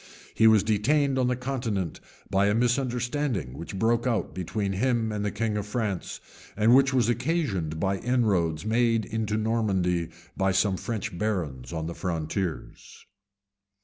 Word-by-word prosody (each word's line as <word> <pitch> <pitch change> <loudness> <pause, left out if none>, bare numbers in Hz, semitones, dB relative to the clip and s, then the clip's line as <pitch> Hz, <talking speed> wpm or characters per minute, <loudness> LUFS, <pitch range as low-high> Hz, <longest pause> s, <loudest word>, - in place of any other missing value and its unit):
He 110 - +5
was 110 -2 +6
detained 130 +6 +2
on 125 - +2
the 125 - +1
continent 120 - -3 0.3
by 100 +1 +3
a 105 - +2
misunderstanding 120 - 0
which 85 +6 -7
broke 115 +3 +2
out 115 -4 -1
between 95 +3 -2
him 115 +1 +1
and 105 -1 -2
the 105 - 0
king 110 0 -1
of 105 -1 -3
France, 105 -4 -3 0.4
and 110 +3 +5
which 135 +1 +5
was 125 -4 +2
occasioned 120 - -1
by 95 +2 0
inroads 100 -10 +1
made 115 0 +2
into 110 -1 -2
Normandy 95 -7 0 0.3
by 95 -1 +1
some 95 +1 +2
French 105 -2 -4
barons 85 - -3
on 80 -1 -3
the 85 - -4
frontiers. 85 0 -4
105 Hz, 150 wpm, -27 LUFS, 95-120 Hz, 0.4 s, was